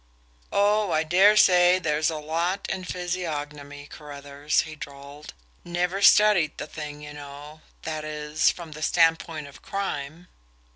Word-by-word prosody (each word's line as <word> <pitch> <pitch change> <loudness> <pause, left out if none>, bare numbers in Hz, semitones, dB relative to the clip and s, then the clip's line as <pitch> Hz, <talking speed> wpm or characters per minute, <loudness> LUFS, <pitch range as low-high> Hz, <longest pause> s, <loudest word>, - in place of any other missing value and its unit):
"Oh, 205 -1 +2
I 155 0 +2
dare 190 +6 +5
say 180 -3 +6
there's 155 -3 0
a 160 - -4
lot 165 +5 -2
in 185 -1 -4
physiognomy, 150 -6 -5
Carruthers," 145 -1 -3
he 155 - -9
drawled. 140 +1 -11 0.3
"Never 180 +3 -2
studied 200 -7 +5
the - - -5
thing, 150 -1 -8
you 150 0 -9
know 145 +1 -11 0.2
that 155 -1 -4
is, 150 0 0
from 170 -3 -6
the 155 0 -9
standpoint 165 -1 +1
of 140 - -14
crime. 175 -4 -5
155 Hz, 140 wpm, -25 LUFS, 150-180 Hz, 0.3 s, say